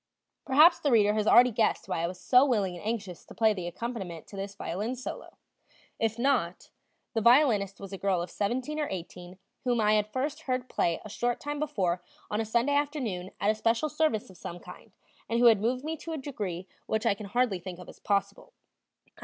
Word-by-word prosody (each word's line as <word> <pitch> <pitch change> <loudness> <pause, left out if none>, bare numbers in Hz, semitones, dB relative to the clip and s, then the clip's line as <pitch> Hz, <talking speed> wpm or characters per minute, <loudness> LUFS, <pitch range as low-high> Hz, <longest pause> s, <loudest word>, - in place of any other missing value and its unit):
Perhaps 305 +6 +6
the 290 - 0
reader 210 -4 +4
has 215 0 0
already 250 +1 +7
guessed 225 0 0
why 165 - -1
I 170 - 0
was 180 +1 -7
so 250 +5 +5
willing 205 -9 +1
and 175 - -10
anxious 205 -5 -4
to - - -14
play 220 -1 +4
the 180 -4 -5
accompaniment 190 -5 -5
to - - -10
this 195 0 -5
violin 210 +6 -3
solo; 255 - -8 0.6
if 225 0 0
not 235 -9 0 0.4
the 225 - 0
violinist 230 -5 +4
was 195 0 -8
a 195 - -6
girl 195 -3 +1
of 175 - -8
seventeen 255 +9 -2
or 300 - 0
eighteen 180 0 -7 0.3
whom 245 -2 +1
I 210 -1 +3
had 210 -1 +2
first 280 +5 -2
heard 255 0 -1
play 170 -8 0
a - - -5
short 240 +3 -1
time 290 0 -4
before 190 - -1 0.3
on 210 +1 0
a - - -2
Sunday 235 +6 +1
afternoon 270 -11 -1
at 205 - +3
a - - 0
special 230 +6 0
service 300 -10 0
of 185 - -16
some 175 - -7
kind, - - -13 0.4
and 230 - +1
who 245 - +4
had 225 -4 +6
moved 250 +4 0
me 315 +1 -3
to 325 +2 -6
a - - -3
degree 205 - -5 0.2
which 220 +1 -1
now - - +4
I - - +3
can 200 +1 -8
hardly 235 -3 +1
think 180 0 -8
of 180 - -11
as - - -13
possible. 200 - -2
220 Hz, 220 wpm, -29 LUFS, 195-255 Hz, 0.6 s, already